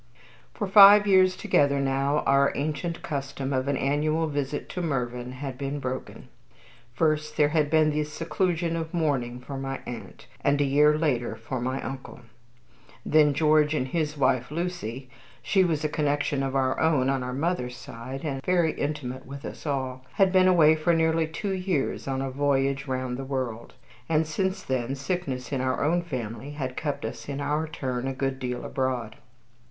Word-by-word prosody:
For 205 - -2
five 205 +1 +9
years 185 -2 +5
together 140 -4 +2
now 140 +2 +1
our 140 0 +4
ancient 155 +3 -3
custom 140 -2 -3
of 130 +1 0
an 140 -1 +1
annual 155 +4 +1
visit 145 -1 -3
to 180 - -4
Mervyn 125 -5 -2
had 130 -1 -6
been 140 +1 -3
broken. 130 -1 -6 0.6
First 155 +2 0
there 150 -1 +4
had 150 -1 +1
been 155 0 +4
the 150 0 0
seclusion 165 +2 -1
of 165 +1 -4
mourning 130 -7 0
for 135 +1 -6
my 135 0 -4
aunt, 120 -2 -8 0.2
and 140 0 +2
a - - +4
year 150 +2 +4
later 135 -7 0
for 130 -2 -5
my 130 +2 -2
uncle; 130 -1 -7 0.8
then 150 -2 +4
George 155 0 +3
and 130 -3 -1
his 155 -1 -1
wife, 130 -3 +1
Lucy, 150 -7 -4 0.4
she 195 -2 +3
was 160 -4 0
a - - +2
connection 145 -2 0
of 135 0 -2
our 130 -1 +1
own 150 -5 +3
on 135 -1 +1
our 125 0 -4
mother's 130 -3 -2
side, 130 +5 -8
and 135 -3 -3
very 175 -3 +2
intimate 135 -4 -4
with 140 +1 -8
us - - -7
all, 130 -2 -2
had 195 -2 +3
been 185 0 +5
away 160 -4 +6
for 160 +2 +2
nearly 160 0 +2
two 195 +5 -4
years 185 -9 -1
on 135 0 -1
a 135 - -3
voyage 140 0 0
round 130 -1 -2
the 135 - -5
world; 130 -4 -4 0.3
and 160 0 +2
since 190 +5 -2
then 130 0 -2
sickness 140 -4 -3
in 135 -2 -1
our 130 +1 0
own 170 +4 +2
family 130 -4 -5
had 130 -3 -4
kept 145 -3 -3
us - - -6
in 140 0 -3
our 150 +2 -1
turn 130 -5 -3
a 135 - -2
good 135 0 -2
deal 125 -1 -4
abroad. 125 -4 -2
140 Hz, 180 wpm, -26 LUFS, 130-155 Hz, 0.8 s, five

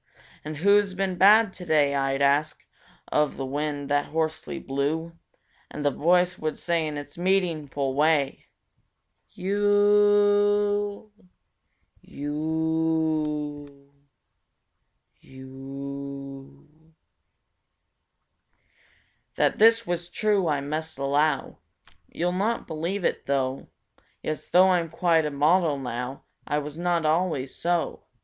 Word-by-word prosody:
And 155 0 -6
"Who's 200 +2 +3
been 190 -1 -1
bad 205 +3 +5
to 180 - -9
day?" 150 -4 +2
I'd 135 0 0
ask 140 +2 +1 0.4
Of 150 -1 0
the 135 - -3
wind 145 +1 -3
that 145 0 +1
hoarsely 160 0 -3
blew, 155 +5 -3 0.5
And 145 - -6
the 145 - +3
voice 180 +5 +2
would 155 -1 -3
say 170 -2 -1
in 150 -1 -5
its 145 +3 -9
meaningful 160 -7 0
way: 145 -1 +1 0.9
"Yoooooooo! 205 +1 +2 0.9
Yoooooooo! 150 -2 -2 1.3
Yoooooooo!" 140 +3 -10 2.4
That - - +1
this 230 +1 +5
was 175 -1 -3
true 205 -2 +1
I 145 -3 0
must 155 +2 -4
allow— 140 +1 0 0.5
You'll 175 +1 -2
not 205 +6 -1
believe 170 +5 -3
it, - - -2
though! 135 -1 -1 0.6
Yes, 155 - -4
though 185 +1 +5
I'm 170 -2 +1
quite 165 -1 +2
a - - -2
model 150 +2 +2
now, 125 0 -5 0.2
I 150 - 0
was 150 +2 -5
not 175 -2 0
always 155 -4 0
so. 175 0 -2
155 Hz, 105 wpm, -25 LUFS, 140-180 Hz, 2.4 s, bad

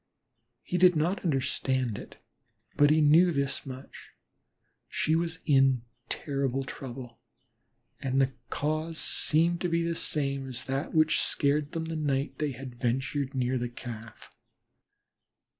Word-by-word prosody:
He 180 - -1
did 180 0 +6
not 170 +6 0
understand 130 - 0
it, - - -11 0.6
but 145 0 +5
he 155 +1 +4
knew 165 +4 +6
this 140 -2 -2
much, 130 +1 -10 0.7
she 155 - 0
was 165 0 -1
in 135 -4 +4 0.3
terrible 135 -2 -1
trouble, 125 -2 -8 0.8
and 135 0 0
the 135 0 +2 0.2
cause 155 +2 -2
seemed 165 +3 +2
to 180 - 0
be 170 0 +1
the 170 0 0
same 140 -4 -1
as 125 -2 -3
that 135 +4 -3
which 155 0 +4
had - - +2
scared 145 0 +1
them 165 -1 -2
the 165 0 -4
night 145 -2 -1
they 150 -2 -1
had 130 0 -8
ventured 135 +3 -1
near 130 0 0
the 120 0 -2
Calf. 115 -2 -9
140 Hz, 140 wpm, -29 LUFS, 130-155 Hz, 0.8 s, did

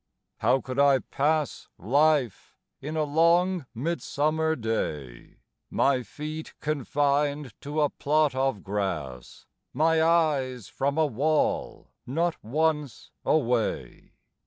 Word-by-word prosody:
How - - +3
I - - -7
could 135 +2 +2
pass 150 +1 0
Life 140 - +1 0.2
in 155 +3 -5
a 155 - +2
long 170 +2 +2
midsummer 160 +2 0
day, 75 - -4 0.3
My 135 -2 +2
feet 155 +5 -7
confined 145 -2 0
to 150 +2 -2
a 145 - +2
plot 150 -1 +1
of 130 -6 -1
grass, 85 -11 -4 0.3
My 160 +3 +3
eyes 150 - +1
from 140 +2 -2
a 160 - +4
wall 150 +4 -1 0.2
not 165 +6 -1
once 150 +2 -1
away! 125 -7 -1
145 Hz, 110 wpm, -26 LUFS, 125-155 Hz, 0.3 s, a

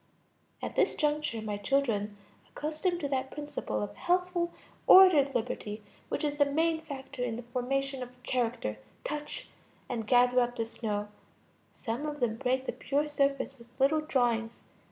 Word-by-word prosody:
At - - -4
this - - +3
juncture 295 -7 0
my 210 -1 -2
children, 210 -3 0 0.3
accustomed 315 +4 -2
to 285 - 0
that 265 -1 -1
principle 290 - -3
of 105 0 -5
healthful, 355 -1 +1 0.4
ordered 310 -8 +8
liberty 215 -2 -3 0.3
which - - -2
is 290 0 -1
the 285 - +6
main 320 +3 +1
factor 275 -4 -6
in 235 -2 -1
the 240 - -6
formation 265 +2 -2
of 250 0 -9
character, 235 - -1 0.2
touch 300 +11 -5 0.4
and 230 -4 -3
gather 250 +1 +5
up 245 0 +1
the 230 -2 -1
snow; 210 -2 -3 0.6
some 240 +7 -4
of 295 -1 -4
them 230 -3 0
break 255 +2 0
the - - -1
pure 290 +2 0
surface 275 -2 0
with 235 - -14
little 295 +4 +4
drawings. 235 -6 +1
265 Hz, 155 wpm, -30 LUFS, 235-295 Hz, 0.6 s, ordered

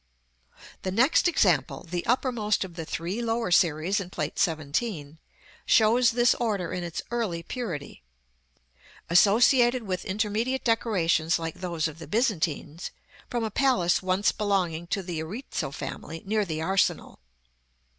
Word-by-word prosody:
§ - - -44 0.5
XL. - - -17 0.2
The 185 - -3
next 260 - +4
example, 180 - +2
the 175 +1 -3
uppermost 235 -4 +1
of 185 -2 -8
the 165 -1 -6
three 180 +8 -3
lower 230 -4 -1
series 175 +3 +3
in 185 -3 -6
Plate 155 -4 -4
XVII., 155 -1 -1 0.5
shows 230 +2 +5
this 240 +1 +3
order 205 -7 -2
in 180 - -3
its 170 -2 -5
early 210 -9 -2
purity; 170 - -6 1.1
associated 240 +6 +5
with 185 -4 -3
intermediate 215 +6 -1
decorations 180 -8 +1
like 165 -1 -5
those 170 -3 -1
of 160 +1 -10
the 165 - -9
Byzantines, 170 - -1 0.4
from 240 -2 -2
a 220 - -2
palace 190 -11 +2
once 185 +2 +2
belonging 180 -5 -1
to 195 +2 -2
the 175 -3 -4
Erizzo 195 - -4
family, 160 +2 -7
near 210 +1 +1
the 160 -3 -3
Arsenal. 190 +3 0
190 Hz, 145 wpm, -27 LUFS, 165-230 Hz, 1.1 s, shows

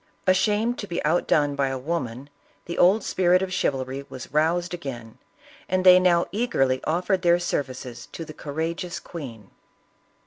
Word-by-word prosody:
Ashamed 210 +5 +2
to 205 - -5
be 170 - -3
outdone 150 -2 +2
by 140 -1 0
a 135 0 -2
woman, 135 -2 -4 0.3
the 170 - -5
old 195 +4 +5
spirit 180 0 +2
of 185 -1 -4
chivalry 135 -4 -1
was 130 - -9
roused 170 +4 +1
again, 120 -10 -7 0.5
and 185 0 0
they 180 0 +9
now 175 -2 +3
eagerly 135 - 0
offered 180 +4 0
their 175 -1 +4
ser 175 -4 0
vices 125 -2 -9
to 165 - -7
the 155 - -10
courageous 165 +5 -4
queen. 120 - -9
170 Hz, 160 wpm, -24 LUFS, 135-180 Hz, 0.5 s, they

